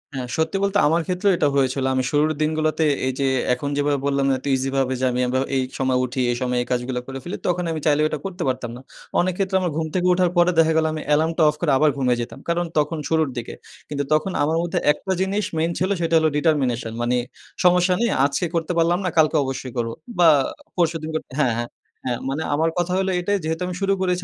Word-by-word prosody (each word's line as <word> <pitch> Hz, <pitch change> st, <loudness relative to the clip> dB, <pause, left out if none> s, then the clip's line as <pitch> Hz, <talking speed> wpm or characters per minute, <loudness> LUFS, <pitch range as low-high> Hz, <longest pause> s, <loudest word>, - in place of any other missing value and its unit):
হ্যাঁ, 125 Hz, -2 st, -4 dB
সত্যি 160 Hz, +4 st, 0 dB
বলতে 200 Hz, 0 st, +1 dB
আমার 165 Hz, +2 st, +2 dB
ক্ষেত্রেও 185 Hz, +2 st, +1 dB
এটা 145 Hz, -, +2 dB
হয়েছিল। 135 Hz, 0 st, +1 dB
আমি 130 Hz, 0 st, +1 dB
শুরুর 150 Hz, +1 st, +2 dB
দিনগুলাতে 155 Hz, 0 st, +1 dB, 0.2 s
এই 130 Hz, -, -1 dB
যে 135 Hz, -, +1 dB, 0.3 s
এখন 140 Hz, +3 st, -3 dB
যেভাবে 145 Hz, -1 st, +1 dB
বললাম 140 Hz, -1 st, +1 dB
এত 130 Hz, -, -13 dB
ইজি 130 Hz, +1 st, -1 dB
ভাবে 130 Hz, -1 st, +1 dB
যে 130 Hz, -, +1 dB
আমি 125 Hz, -, -2 dB
আবা 130 Hz, +1 st, 0 dB, 0.2 s
এই 130 Hz, -, +2 dB, 0.2 s
সময় 130 Hz, -1 st, +1 dB
উঠি 130 Hz, +1 st, -3 dB
এই 120 Hz, -, -2 dB
সময়ে 125 Hz, -1 st, 0 dB
এই -, -, -15 dB
কাজগুলা 125 Hz, 0 st, -1 dB
করে 135 Hz, 0 st, -6 dB
ফেলি। 175 Hz, -, -5 dB
তখন 180 Hz, 0 st, 0 dB
আমি 160 Hz, -, -3 dB
চাইলেও 150 Hz, 0 st, +3 dB
এটা 155 Hz, -, -3 dB
করতে 180 Hz, -2 st, -4 dB
পারতাম 125 Hz, -2 st, -2 dB
না। -, -, -11 dB, 0.4 s
অনেক 185 Hz, 0 st, +1 dB
ক্ষেত্রে 190 Hz, -1 st, -1 dB
আমার 175 Hz, -3 st, -1 dB
ঘুম 160 Hz, -1 st, -1 dB
থেকে 180 Hz, -1 st, +1 dB
উঠার 180 Hz, -1 st, +2 dB
পরে 175 Hz, +1 st, +5 dB
দেখা 160 Hz, 0 st, +5 dB
গেলো 160 Hz, 0 st, +2 dB
আমি 155 Hz, -, -4 dB
এলার্মটা 160 Hz, +2 st, +2 dB
অফ 150 Hz, -, -2 dB
করে 155 Hz, -5 st, +2 dB
আবার 155 Hz, +1 st, +4 dB
ঘুমায় 125 Hz, -2 st, +1 dB
যেতাম। 120 Hz, -, -7 dB
কারণ 175 Hz, +1 st, +1 dB
তখন 150 Hz, +2 st, +1 dB
শুরুর 160 Hz, -3 st, +2 dB
দিকে। 120 Hz, -, -5 dB, 0.4 s
কিন্তু 145 Hz, -1 st, -2 dB
তখন 155 Hz, +5 st, +1 dB
আমার 160 Hz, +2 st, +1 dB
মধ্যে 175 Hz, +1 st, -1 dB
একটা 190 Hz, +5 st, -4 dB
জিনিস 200 Hz, +2 st, 0 dB
মেইন 165 Hz, +2 st, +1 dB
ছিল 185 Hz, -, 0 dB
সেটা 165 Hz, 0 st, +1 dB
হল 160 Hz, -, +2 dB
determination 130 Hz, -8 st, +1 dB
মানে 125 Hz, +1 st, +1 dB, 0.5 s
সমস্যা 180 Hz, +1 st, +4 dB
নেই 235 Hz, -, +2 dB, 0.2 s
আজকে 140 Hz, +5 st, 0 dB
করতে 165 Hz, +1 st, -1 dB
পারলাম 170 Hz, +2 st, +3 dB
না। -, -, +1 dB
কালকে 155 Hz, 0 st, +4 dB
অবশ্যই 130 Hz, -1 st, -5 dB
করব। 115 Hz, -1 st, -1 dB, 0.3 s
বা 170 Hz, -, +7 dB, 0.5 s
পরশুদিন 165 Hz, -2 st, 0 dB
করতে 155 Hz, -, -5 dB
হ্যাঁ, 130 Hz, -6 st, +3 dB
হ্যাঁ, 120 Hz, 0 st, -3 dB, 0.4 s
হ্যাঁ 120 Hz, -2 st, -1 dB
মানে 145 Hz, +4 st, -2 dB
আমার 160 Hz, +3 st, +2 dB
কথা 175 Hz, +1 st, 0 dB
হইলো 190 Hz, 0 st, 0 dB
এটাই 205 Hz, +3 st, 0 dB
যেহেতু 160 Hz, +2 st, -2 dB
আমি 180 Hz, -, -4 dB
শুরু 195 Hz, 0 st, +2 dB
করেছি 180 Hz, -1 st, 0 dB
155 Hz, 230 wpm, -22 LUFS, 135-175 Hz, 0.5 s, বা